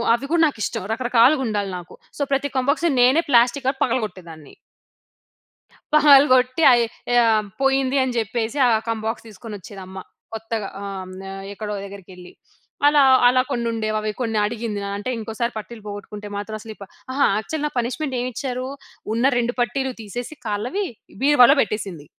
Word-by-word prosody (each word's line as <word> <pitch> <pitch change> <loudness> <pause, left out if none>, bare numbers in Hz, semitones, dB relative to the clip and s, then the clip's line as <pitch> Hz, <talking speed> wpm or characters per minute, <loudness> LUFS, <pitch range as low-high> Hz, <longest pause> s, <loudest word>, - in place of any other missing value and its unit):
అవి 275 +4 -7
కూడా 335 -1 +4
నాకిష్టం 215 -7 -4
రకరకాలుగా 250 +3 +3
ఉండాలి 205 -2 -2
నాకు. 175 -1 -11 0.2
సో, - - -5
ప్రతి 280 +1 0
కంబాక్స్ 280 +6 +1
నేనే 260 +7 +5
ప్లాస్టిక్‌గా 255 +2 +3
పగలగొట్టేదాన్ని. 185 - -4 1.4
పగలగొట్టి 275 -1 +5
అయి 240 -1 +4 0.4
ఆహ్, 220 -2 +2 0.2
పోయింది 270 0 +2
అని 255 -2 -3
చెప్పేసి, 225 +3 -3
ఆ - - +3 0.2
కంబాక్స్ 225 +1 -3
తీసుకొని 215 +1 -9
వచ్చేది 195 +2 -11
అమ్మ, 190 +1 -11 0.4
కొత్తగా 225 -2 -4 0.2
ఆహ్, 190 -2 -6 0.4
ఎక్కడో 210 0 -5
దగ్గరికెళ్లి. 185 -2 -12 0.5
అలా 290 0 +5 0.3
అలా 255 +1 +4
కొన్ని 240 -3 -1
ఉండేవి. 215 -1 -2
అవి 215 0 -2
కొన్ని 225 -3 -1
అడిగింది. 220 -1 -4 0.2
అంటే 205 - -5
ఇంకోసారి 225 +2 -3
పట్టీలు 220 +1 -8
పోగొట్టుకుంటే 205 0 -8
మాత్రం 210 +1 -5
అసలు 220 +1 -10
ఈ - - -34
ప - - -5 0.3
అహా! 280 +1 +3
యాక్చువల్ 295 +7 -4
నా - - 0
పనిష్మెంట్ 260 +4 -3
ఏమిచ్చారూ 255 +1 -4 0.5
ఉన్న 235 +3 +1
2 240 +1 0
పట్టీలు 265 +3 0
తీసేసి 240 +7 -7
కాళ్ళవి 245 - -2 0.4
బీరువాలో 275 -2 +6
పెట్టేసింది. 195 -7 -4
235 Hz, 145 wpm, -22 LUFS, 210-260 Hz, 1.4 s, బీరువాలో